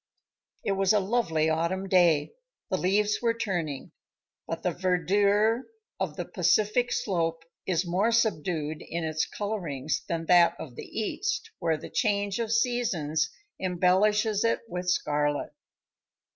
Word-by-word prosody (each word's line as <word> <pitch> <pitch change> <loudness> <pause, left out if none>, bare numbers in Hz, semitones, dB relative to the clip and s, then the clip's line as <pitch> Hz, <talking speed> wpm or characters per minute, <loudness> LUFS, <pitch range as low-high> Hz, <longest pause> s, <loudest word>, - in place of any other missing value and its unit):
It - - +1
was 195 +1 +2
a 210 - +4
lovely 190 -7 +1
autumn 170 +5 0
day. 175 - +3 0.4
The 185 - +2
leaves 205 +4 +1
were 230 -1 +1
turning, 175 -11 -3 0.6
but - - -4
the - - +1
verdure 200 +6 +2 0.3
of - - -2
the - - -4
Pacific 230 +4 +2
slope 165 -4 -1 0.2
is 185 0 +1
more 190 +6 +1
subdued 165 -9 0
in 170 0 -4
its 155 0 -1
colorings 170 -9 -3
than 165 -1 -2
that 170 -1 +5
of 135 - -8
the - - -8
East, 405 - -3
where 165 -2 +1
the - - -10
change 205 -2 0
of 225 -2 -2
seasons 190 - +1 0.3
embellishes 200 +4 +2
it 230 - +1
with 180 -3 -3
scarlet. 145 -3 0
185 Hz, 135 wpm, -27 LUFS, 165-210 Hz, 0.6 s, that